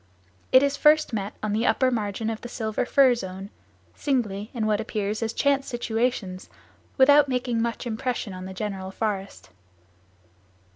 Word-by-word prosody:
It 260 Hz, +1 st, +7 dB
is 280 Hz, 0 st, +1 dB
first 305 Hz, -3 st, +4 dB
met 205 Hz, -1 st, -3 dB
on 210 Hz, -1 st, -1 dB
the 225 Hz, +3 st, +1 dB
upper 260 Hz, -1 st, +3 dB
margin 220 Hz, -1 st, -2 dB
of 220 Hz, -, -6 dB
the 240 Hz, -, -7 dB
silver 220 Hz, 0 st, -2 dB
fir 270 Hz, -3 st, +5 dB
zone, 195 Hz, -3 st, -6 dB, 0.4 s
singly, 215 Hz, -, -2 dB
in 230 Hz, -5 st, -2 dB
what 215 Hz, 0 st, +1 dB
appears 215 Hz, -1 st, -3 dB
as 225 Hz, -1 st, -1 dB
chance 275 Hz, +2 st, +1 dB
situations 230 Hz, -5 st, -2 dB, 0.5 s
without 285 Hz, +1 st, +6 dB
making 245 Hz, -2 st, -1 dB
much 235 Hz, +2 st, -2 dB
impression 230 Hz, -2 st, -3 dB
on 185 Hz, 0 st, -7 dB
the 190 Hz, -, -7 dB
general 190 Hz, -2 st, -4 dB
forest. 195 Hz, -, -4 dB
225 Hz, 155 wpm, -25 LUFS, 200-255 Hz, 0.5 s, It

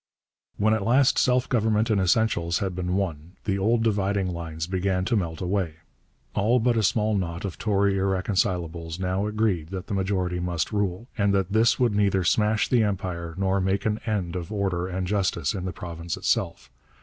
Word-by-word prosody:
When 110 Hz, +1 st, +3 dB
at 110 Hz, -, 0 dB
last 125 Hz, +5 st, +4 dB
self 125 Hz, 0 st, +2 dB
government 110 Hz, -2 st, +1 dB
in 105 Hz, -, +3 dB
essentials 90 Hz, -3 st, +2 dB
had 95 Hz, -2 st, -2 dB
been 90 Hz, 0 st, -2 dB
won, 85 Hz, -3 st, -3 dB
the 100 Hz, -1 st, -1 dB
old 115 Hz, +4 st, +2 dB
dividing 100 Hz, -3 st, 0 dB
lines 80 Hz, -1 st, -4 dB
began 95 Hz, +1 st, -1 dB
to 115 Hz, -, +1 dB
melt 85 Hz, -6 st, -2 dB
away. 90 Hz, -3 st, -1 dB, 0.6 s
All 115 Hz, +5 st, +2 dB
but 120 Hz, +1 st, +2 dB
a 115 Hz, -, +2 dB
small 110 Hz, +1 st, +2 dB
knot 85 Hz, -2 st, -3 dB
of 95 Hz, -, -5 dB
Tory 100 Hz, -2 st, +2 dB
irreconcilables 90 Hz, -3 st, -1 dB
now 95 Hz, +2 st, -1 dB
agreed 105 Hz, -7 st, 0 dB
that 95 Hz, 0 st, -5 dB
the -, -, -5 dB
majority 95 Hz, -2 st, -1 dB
must 90 Hz, -1 st, -2 dB
rule, 100 Hz, +1 st, -1 dB
and 100 Hz, -1 st, +3 dB
that 95 Hz, 0 st, 0 dB
this 115 Hz, +3 st, +4 dB
would 120 Hz, -4 st, +3 dB
neither 100 Hz, -2 st, +2 dB
smash 105 Hz, +4 st, +2 dB
the 125 Hz, -3 st, +3 dB
Empire 90 Hz, -5 st, -2 dB
nor 95 Hz, 0 st, +1 dB
make 95 Hz, +1 st, 0 dB
an 110 Hz, 0 st, 0 dB
end 95 Hz, -5 st, -1 dB
of 90 Hz, +2 st, -5 dB
order 95 Hz, -4 st, -1 dB
and 95 Hz, 0 st, -3 dB
justice 90 Hz, -6 st, 0 dB
in 95 Hz, -2 st, -4 dB
the 90 Hz, -, -2 dB
province 85 Hz, +1 st, -6 dB
itself. -, -, -1 dB
95 Hz, 185 wpm, -25 LUFS, 90-105 Hz, 0.6 s, last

